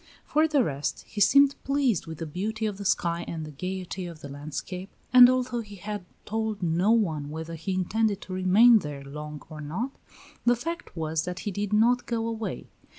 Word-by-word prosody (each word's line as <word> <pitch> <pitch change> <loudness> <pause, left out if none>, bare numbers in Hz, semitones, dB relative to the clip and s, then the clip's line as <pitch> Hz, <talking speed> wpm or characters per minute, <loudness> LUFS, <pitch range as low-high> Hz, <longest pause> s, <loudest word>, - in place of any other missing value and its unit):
For 310 +1 +3
the 295 -5 +3
rest, 140 -6 -3
he 210 - -5
seemed 280 +6 +5
pleased 275 - +1
with 160 -1 -6
the 165 - -4
beauty 215 +8 -3
of 205 -2 -3
the 200 - -6
sky 170 -2 +1
and 160 -2 -4
the 155 - -8
gayety 185 +3 -5
of 165 -3 -10
the 140 - -8
landscape, 155 +7 -6 0.2
and 250 -1 +10
although 255 -2 0
he 205 -2 -11
had 205 0 -6 0.2
told 220 -2 -2
no 175 +4 +2
one 165 -11 +2
whether 160 +2 -6
he 175 +4 -3
intended 205 +2 +1
to 185 - -7
remain 205 +6 +6
there 145 -5 -6
long 150 +2 -7
or 155 -1 -9
not, 185 - -3 0.5
the 240 0 +4
fact 335 - -6
was 160 0 -1
that 180 0 -4
he 205 - -3
did 205 +1 -3
not 235 +4 +3
go 230 -1 -1
away. 225 -1 -4
190 Hz, 200 wpm, -27 LUFS, 160-225 Hz, 0.5 s, and